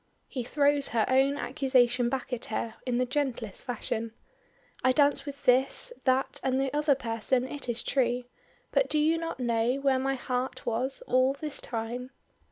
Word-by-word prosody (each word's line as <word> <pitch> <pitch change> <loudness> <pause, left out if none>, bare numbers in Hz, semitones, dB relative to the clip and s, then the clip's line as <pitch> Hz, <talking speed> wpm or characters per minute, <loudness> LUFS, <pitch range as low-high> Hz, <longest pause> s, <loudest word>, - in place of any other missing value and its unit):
He 255 - -4
throws 285 +2 +2
her 225 -1 +1
own 270 +2 +3
accusation 255 -5 +2
back 260 0 -3
at 240 - -3
her 225 +1 -3
in 245 -1 +1
the 255 - +2
gentlest 250 -6 -3
fashion. 230 -2 -3 0.7
"I 260 - +4
danced 290 +1 +3
with 280 0 -8
this, 265 - +3
that, 260 0 +1
and 265 0 +1
the 270 0 -1
other 295 -1 +3
person 245 +1 0
it 280 -2 -6
is 235 -1 -1
true, 245 -2 +1 0.5
but - - +2
do 305 - +2
you 315 +2 +3
not 330 -4 -4
know 235 0 +1
where 275 -1 +2
my 270 +1 0
heart 250 0 -3
was 250 +4 -1
all 255 +1 +3
this 295 +1 -5
time?" 240 +2 -4
260 Hz, 175 wpm, -28 LUFS, 240-275 Hz, 0.7 s, I